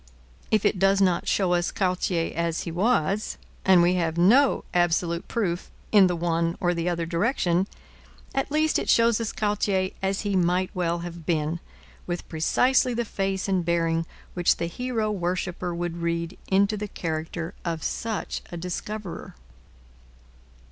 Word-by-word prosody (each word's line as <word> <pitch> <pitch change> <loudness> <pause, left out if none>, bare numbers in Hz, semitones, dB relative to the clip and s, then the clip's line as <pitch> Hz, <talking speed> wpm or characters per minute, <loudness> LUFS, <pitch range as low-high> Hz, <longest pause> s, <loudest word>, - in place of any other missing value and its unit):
If 215 -1 +2
it 200 -2 +2
does 195 +1 +4
not 185 -3 +2
show 185 -3 +2
us 175 0 +1
Cartier 180 -3 0
as 170 -1 -1
he 170 - -5
was, 200 +1 +1 0.3
and 185 -2 +6
we 175 +1 +4
have 165 0 -1
no 245 +11 +5
absolute 175 0 +1
proof 180 -6 -2 0.2
in 200 -3 +7
the 180 - 0
one 165 0 0
or 175 -1 +1
the 170 0 -1
other 170 -1 -1
direction, 175 0 +1 0.7
at 270 0 -1
least 310 +1 +2
it - - -4
shows 230 -1 +4
us 225 - -2
Cartier 195 -2 0
as 195 0 0
he 205 -2 -1
might 180 +1 +2
well 170 -1 -1
have 170 -2 -9
been, 160 0 0 0.5
with 175 0 -4
precisely 250 +10 +2
the 240 0 -1
face 195 -2 -2
and 190 -2 +1
bearing 165 -1 +1 0.3
which 175 -1 +2
the 170 - -1
hero 225 +4 -2
worshipper 180 -1 -2
would 170 0 -3
read 170 +1 -2
into 200 +2 +3
the 210 +1 -4
character 165 -1 -4
of 165 -3 -3
such 225 -2 -3
a 175 - -5
discoverer. 180 +3 -5
180 Hz, 155 wpm, -25 LUFS, 170-200 Hz, 0.7 s, in